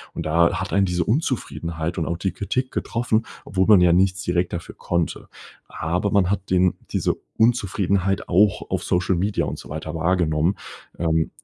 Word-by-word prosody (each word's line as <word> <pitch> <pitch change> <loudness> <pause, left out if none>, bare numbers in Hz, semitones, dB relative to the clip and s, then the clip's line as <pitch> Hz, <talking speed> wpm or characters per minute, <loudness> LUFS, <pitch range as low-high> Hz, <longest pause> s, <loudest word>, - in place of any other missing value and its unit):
Und - - -4
da 85 +2 +2
hat - - -4
einen 100 0 +4
diese 90 -1 0
Unzufriedenheit 85 - -2
und 80 - -1
auch 85 - -2
die 95 +2 -1
Kritik 130 +6 -2
getroffen, 115 -1 -1 0.2
obwohl 95 0 0
man 105 -3 +7
ja 90 -1 +5
nichts 95 +2 +2
direkt 90 0 0
dafür 85 - -6
konnte. 85 -2 -2 0.4
Aber 90 +5 -2
man 100 -3 +3
hat 100 -1 -3
den 90 0 +3 0.2
diese - - 0 0.2
Unzufriedenheit 100 -4 +1
auch 100 +3 +2
auf - - -1
Social 90 +1 +1
Media 100 +3 0
und - - -5
so - - -12
weiter 80 +1 -5
wahrgenommen. 80 0 +1 0.4
Ähm, 80 -1 +1
90 Hz, 175 wpm, -23 LUFS, 85-100 Hz, 0.4 s, man